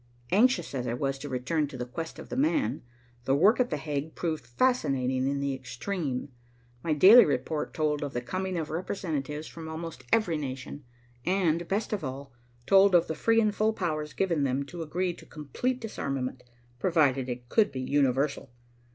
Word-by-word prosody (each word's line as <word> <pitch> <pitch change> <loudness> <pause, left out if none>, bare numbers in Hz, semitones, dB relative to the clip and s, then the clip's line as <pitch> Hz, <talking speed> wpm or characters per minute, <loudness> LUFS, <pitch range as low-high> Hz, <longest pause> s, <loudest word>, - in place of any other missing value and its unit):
Anxious 210 - +3
as 125 -2 -2
I 120 - -1
was 135 +1 -2
to 145 - -6
return 140 +4 -1
to 140 -2 -9
the 125 - -3
quest 165 +6 -6
of - - -10
"the - - -4
man," 290 +2 +1 0.4
the 135 - +3
work 200 - +5
at 250 - +2
The 150 - -1
Hague 145 +1 -4
proved 160 -7 -3
fascinating 130 - +1
in 140 0 0
the 140 -1 0
extreme. 130 +2 -4 0.5
My 165 - -1
daily 200 +11 +9
report 150 +2 -1
told 150 -1 0
of 145 -2 -4
the 120 - -2
coming 185 +7 -3
of 155 -2 -3
representatives 155 -4 -3
from 160 -1 -8
almost 160 -4 -6
every 180 -8 +3
nation, 135 0 -6 0.4
and, 175 -3 +1
best 210 +4 -1
of 205 - -2
all, 135 -1 -6 0.3
told 195 -1 +6
of 170 -1 +5
the - - -3
free 225 +9 +2
and 215 -2 +2
full 215 +1 +1
powers 155 -6 -3
given 170 -6 0
them 135 +1 0
to 170 +5 -8
agree 175 +3 -1
to - - -14
complete 160 - -3
disarmament, 135 - -4 0.4
provided 140 -8 +2
it 120 0 -5
could 210 - +3
be 130 - -4
universal. 140 +1 +1
155 Hz, 185 wpm, -28 LUFS, 135-185 Hz, 0.5 s, daily